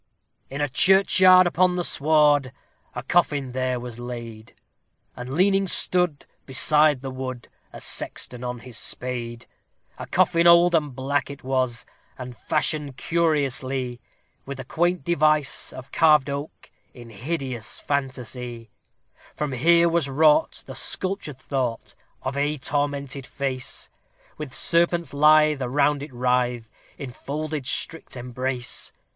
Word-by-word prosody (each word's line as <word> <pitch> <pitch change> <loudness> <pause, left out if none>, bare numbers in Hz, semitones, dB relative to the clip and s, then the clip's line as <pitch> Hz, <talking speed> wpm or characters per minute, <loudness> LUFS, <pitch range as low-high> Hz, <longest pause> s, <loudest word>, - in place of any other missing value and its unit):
In 140 +2 -5
a 145 - +1
churchyard, 185 +4 +5
upon 180 +1 +2
the 180 0 -1
sward, 145 -3 +3 0.4
a - - -5
coffin 145 -7 +1
there 130 0 -1
was 120 -1 -8
laid, 115 -2 -8 0.6
And 125 +2 -7
leaning 195 +2 +3
stood, 180 -4 +1 0.2
beside 150 +1 +3
the 135 - -5
wood, 130 -2 -6 0.2
a - - -10
sexton 125 0 -3
on 125 0 -4
his 120 -3 -5
spade. 120 -2 -3 0.5
A - - -7
coffin 175 -1 +3
old 170 +1 +6
and 150 -5 0
black 135 +2 -1
it 140 0 -10
was, 130 -2 -1 0.3
and 125 -1 -8
fashioned 150 0 -2
curiously, 135 -6 -1 0.4
With 130 -2 -8
quaint 175 0 0
device 155 -3 +1
of 130 +1 -11
carved 150 -3 +4
oak, 140 +2 -7 0.2
in 120 -2 -12
hideous 130 0 -4
fantasie. 125 -4 -4 0.6
For 150 - -2
here 170 +6 +4
was 165 -4 +1
wrought 150 +2 +3
the - - -8
sculptured 185 -7 -3
thought 130 -4 -3 0.3
of 130 +1 -3
a 145 +2 0
tormented 140 -1 -3
face, 130 -2 -3 0.5
With 150 -3 -6
serpents 170 +1 +1
lithe 150 0 +5
that 125 -2 -3
round 145 +1 +2
it 145 0 -8
writhe, 125 -2 -1 0.3
in 135 -4 -7
folded 150 +1 -5
strict 165 -5 -2
embrace. 125 0 -3
140 Hz, 130 wpm, -24 LUFS, 125-155 Hz, 0.6 s, old